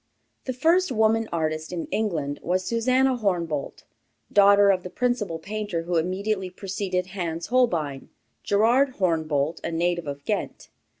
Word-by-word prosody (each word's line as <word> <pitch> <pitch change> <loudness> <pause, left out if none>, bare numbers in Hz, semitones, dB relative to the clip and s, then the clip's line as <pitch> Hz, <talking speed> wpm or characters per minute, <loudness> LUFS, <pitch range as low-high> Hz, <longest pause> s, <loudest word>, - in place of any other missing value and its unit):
The 255 - -2
first 330 +6 +2
woman 220 -1 +2
artist 155 -1 -2
in 170 -2 -3
England 155 -10 -1
was 185 +2 0
Susannah 255 +4 +2
Hornebolt, 170 - -2 0.5
daughter 200 0 +6
of 185 -1 0
the 180 - -7
principal 210 -4 -1
painter 205 -1 -4
who 175 0 -1
immediately 190 +3 -1
preceded 185 -1 -3
Hans 170 -1 -4
Holbein, 160 - +1 0.3
Gerard 245 +6 +2
Hornebolt, 160 -4 0
a - - -2
native 170 0 -1
of 140 0 -6
Ghent. - - -3
185 Hz, 135 wpm, -25 LUFS, 165-220 Hz, 0.5 s, daughter